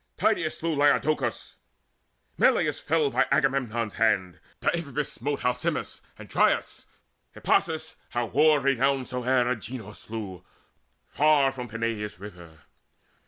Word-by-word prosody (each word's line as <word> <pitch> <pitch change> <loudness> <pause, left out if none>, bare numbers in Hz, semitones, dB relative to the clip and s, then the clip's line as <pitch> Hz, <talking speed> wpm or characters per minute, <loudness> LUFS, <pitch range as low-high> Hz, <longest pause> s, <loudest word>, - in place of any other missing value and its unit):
Tydeides - - +1
slew 165 -1 -1
Laodocus; 145 -3 +1 0.8
Melius - - +2
fell 155 -2 +1
By - - +2
Agamemnon's 130 -6 0
hand; 100 -6 +1 0.2
Deiphobus 150 -4 -1
Smote 140 +2 -3
Alcimus 125 0 -2 0.2
and - - -11
Dryas: - - +1 0.5
Hippasus, 160 0 0
How 120 0 -1
war 150 +5 +4
renowned 135 -1 +1
soe'er, 125 0 +1
Agenor 115 -3 -4
slew 105 -5 -7 0.7
Far 145 -1 +4
from 125 -2 -7
Peneius' 110 -3 -3
river. 85 -5 -12
125 Hz, 110 wpm, -26 LUFS, 110-145 Hz, 0.8 s, war